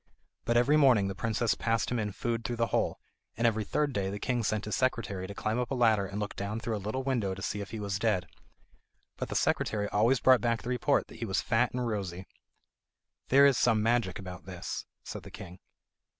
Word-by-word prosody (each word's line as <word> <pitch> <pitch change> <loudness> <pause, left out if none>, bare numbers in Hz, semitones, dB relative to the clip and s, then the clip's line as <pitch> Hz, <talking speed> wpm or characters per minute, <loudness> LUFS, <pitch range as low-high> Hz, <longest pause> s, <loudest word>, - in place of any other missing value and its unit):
But 120 - +2
every 140 +6 +4
morning 120 -9 +5
the - - -3
princess 110 +2 0
passed 115 +3 0
him 120 - 0
in 105 -1 -2
food 115 +3 -2
through 120 +2 -2
the 115 0 +1
hole, - - +1 0.4
and 115 - +1
every 110 -2 +2
third 145 +6 0
day 95 -3 -1
the 100 - -4
king 120 +2 -1
sent 105 -1 -1
his 105 - -2
secretary 105 -7 -1
to 100 - -8
climb 110 +4 -1
up 125 - -2
a 135 - -1
ladder 110 -5 +3
and 100 +2 -5
look 105 -1 -4
down 100 +3 -3
through 115 0 -2
a 105 - -4
little 110 +7 -3
window 115 -8 0
to 95 - -9
see 105 - -2
if 100 - -7
he 110 - -6
was 100 -2 -2
dead. 100 -5 +1 0.9
But - - -4
the - - -4
secretary 105 -2 +1
always 115 +5 +3
brought 130 -2 +5
back 115 0 0
the 120 - -5
report 125 +3 +2
that - - -12
he 115 - -2
was 95 -1 0
fat 120 +1 +2
and 125 -1 -2
rosy. 95 -4 -3 1.0
"There 140 +2 +6
is 140 -3 +4
some 110 -3 +3
magic 115 -4 +1
about 90 -3 -8
this," 90 -2 -5 0.2
said - - -7
the - - -11
king. 90 +2 -10
110 Hz, 230 wpm, -30 LUFS, 100-120 Hz, 1.0 s, There